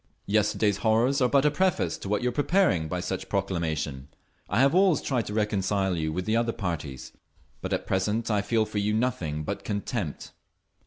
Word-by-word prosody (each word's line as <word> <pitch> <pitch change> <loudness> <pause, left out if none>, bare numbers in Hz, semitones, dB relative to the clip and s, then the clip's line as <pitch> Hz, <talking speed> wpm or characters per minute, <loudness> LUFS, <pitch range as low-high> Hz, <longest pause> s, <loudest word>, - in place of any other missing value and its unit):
Yesterday's 105 -1 +2
horrors 120 +6 +2
are 125 - +4
but 140 +1 +3
a 150 - +4
preface 170 - +1
to 95 - -6
what 105 +3 0
you 125 - +2
are - - -3
preparing 140 - +2
by 90 +2 -3
such 95 +1 -3
a - - -27
proclamation…. 80 -8 -2 0.4
I 100 - +1
have 135 +2 +4
always 185 -3 +4
tried 125 -5 -1
to 105 - -4
reconcile 100 -3 0
you 80 -1 -1
with 90 +3 -3
the 110 - +1
other 115 0 +1
parties, 80 -9 -5 0.5
but - - -4
at - - -1
present 105 +5 0
I 105 -1 +2
feel 110 +2 +1
for 110 -1 -3
you 105 +1 0
nothing 85 -11 -1
but - - -4
contempt!" 100 - -4
105 Hz, 200 wpm, -27 LUFS, 90-120 Hz, 0.5 s, are